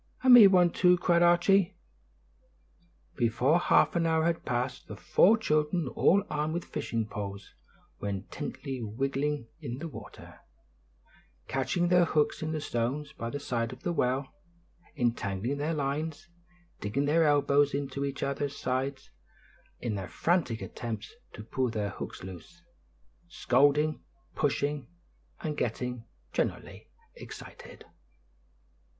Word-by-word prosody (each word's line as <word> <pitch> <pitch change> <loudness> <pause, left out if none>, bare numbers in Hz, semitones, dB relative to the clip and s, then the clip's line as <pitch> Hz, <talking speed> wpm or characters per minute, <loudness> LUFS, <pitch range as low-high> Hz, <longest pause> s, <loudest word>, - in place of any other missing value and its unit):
"And 260 -1 +8
me 230 -5 +11
one, 180 -3 +4
too," 180 0 +4
cried 170 -1 +2
Archie. 175 +2 +4 1.4
Before 125 +7 +2
half - - +3
an 165 -1 +2
hour 160 0 +2
had 170 -1 -1
passed, 125 0 -2
the - - -7
four 185 +8 +4
children, 155 -4 0
all 200 +9 +3
armed 150 +2 -2
with 170 - -3
fishing 115 -1 -3
poles, 100 -1 -7 0.5
were 100 - -3
intently 130 - -5
wiggling 135 +3 -2
in 120 +1 -5
the 165 +4 -5
water, 155 - -11 1.1
catching 170 +6 0
their 180 -1 +5
hooks 150 -2 +1
in 155 0 -2
the 155 - -2
stones 140 +5 -2
by 115 -3 -5
the 145 - -4
side 115 -4 -2
of 130 0 -11
the 175 - -1
well, 130 -2 0 0.7
entangling 115 +1 -1
their 155 +3 -1
lines, 150 +4 -3 0.5
digging 130 +8 -1
their 160 +3 +3
elbows 145 -1 +3
into 140 -1 -3
each 140 -1 -3
other's 140 0 -2
sides, 130 +2 -3 0.7
in 120 -3 -2
their 95 -3 -5
frantic 165 -10 0
attempts 110 -3 -6 0.2
to 105 - -8
pull 125 +3 -1
their 105 -3 -2
hooks - - -7
loose; 95 - -11 0.6
scolding, 150 +2 +2 0.3
pushing, 145 -1 -1 0.5
and 150 -1 -3
getting 125 0 -3 0.3
generally - - -3 0.2
excited. - - -11
140 Hz, 130 wpm, -29 LUFS, 120-160 Hz, 1.4 s, me